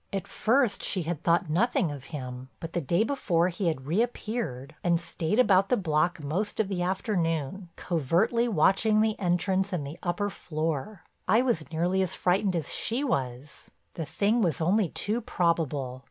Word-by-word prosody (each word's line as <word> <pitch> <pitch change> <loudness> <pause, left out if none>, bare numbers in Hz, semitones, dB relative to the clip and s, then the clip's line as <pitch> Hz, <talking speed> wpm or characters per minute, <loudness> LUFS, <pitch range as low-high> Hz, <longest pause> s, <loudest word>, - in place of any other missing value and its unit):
At 195 -2 -3
first 240 0 +1
she 185 -3 0
had 160 -1 -3
thought 170 +1 +2
nothing 180 0 +1
of 140 -3 -8
him, 130 -4 -7
but 165 0 -7
the 175 - 0
day 170 +8 +2
before 185 -9 +1
he 180 +1 -2
had 130 -5 -1
reappeared, 210 - -2
and 170 -1 +3
stayed 170 +2 -2
about 195 -6 +4
the 250 - +3
block 160 -2 0
most 195 +10 -2
of 210 -3 +1
the 185 -3 -2
afternoon 175 -2 -1
covertly 180 - +1
watching 215 +3 +3
the 220 -1 +2
entrance 185 +1 +1
and 170 -6 -2
the 150 +5 -8
upper 190 +3 -1
floor. 160 +4 -3 0.2
I 230 +3 +4
was 205 -13 -1
nearly 175 +4 +1
as 185 - -1
frightened 185 +1 +1
as 160 -4 -2
she 240 +5 -1
was—the 140 - -4
thing 215 +4 +1
was 170 -9 +1
only 185 +3 +2
too 220 +9 -2
probable. 160 - -1
175 Hz, 170 wpm, -28 LUFS, 160-205 Hz, 0.2 s, about